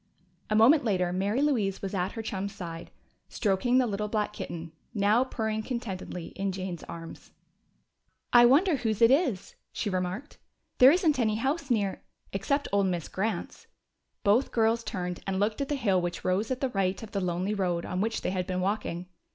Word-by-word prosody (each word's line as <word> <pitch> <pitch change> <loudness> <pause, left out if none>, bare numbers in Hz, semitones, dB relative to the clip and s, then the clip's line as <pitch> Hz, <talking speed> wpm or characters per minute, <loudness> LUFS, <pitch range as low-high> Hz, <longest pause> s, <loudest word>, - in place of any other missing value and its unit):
A 215 - +1
moment 255 +8 +6
later 180 -6 +1
Mary 200 +8 0
Louise 215 -11 0
was 195 - -3
at 185 -1 -1
her 225 - -5
chum's 200 -1 -4
side, 170 -4 -7 0.4
stroking 230 +4 +1
the 260 - +4
little 210 -1 -2
black 210 -1 -1
kitten, 165 -4 -6 0.2
now 210 +4 +4
purring 220 -4 -2
contentedly 200 -7 -5
in 195 0 -3
Jane's 185 -3 -5
arms. 165 -1 -9 1.0
"I 240 0 +9
wonder 305 +5 +4
whose 220 -4 -1
it 230 +1 +6
is," 265 - +1 0.2
she 205 - -2
remarked. 185 +9 -3 0.4
"There 255 - +10
isn't 320 -5 +2
any 215 -3 +2
house 275 +5 -1
near 205 -5 0 0.2
" - - -37
"Except 280 +9 0
old 200 -1 +3
Miss 175 -3 -2
Grant's." 195 -1 -3 0.6
Both 220 +5 +3
girls 230 0 +2
turned 180 -4 -4
and 190 -1 -1
looked 215 +5 0
at 275 - -2
the 295 - +1
hill 200 -9 +2
which 175 0 -4
rose 190 +4 +1
at 260 -1 -2
the 265 - +1
right 195 -2 -1
of 220 - -9
the 200 - -1
lonely 180 +3 -1
road 180 -4 -1
on 180 +1 -2
which 225 +2 -1
they - - -1
had 185 -1 -2
been 185 -1 -1
walking. 185 -2 -2
205 Hz, 190 wpm, -28 LUFS, 185-240 Hz, 1.0 s, There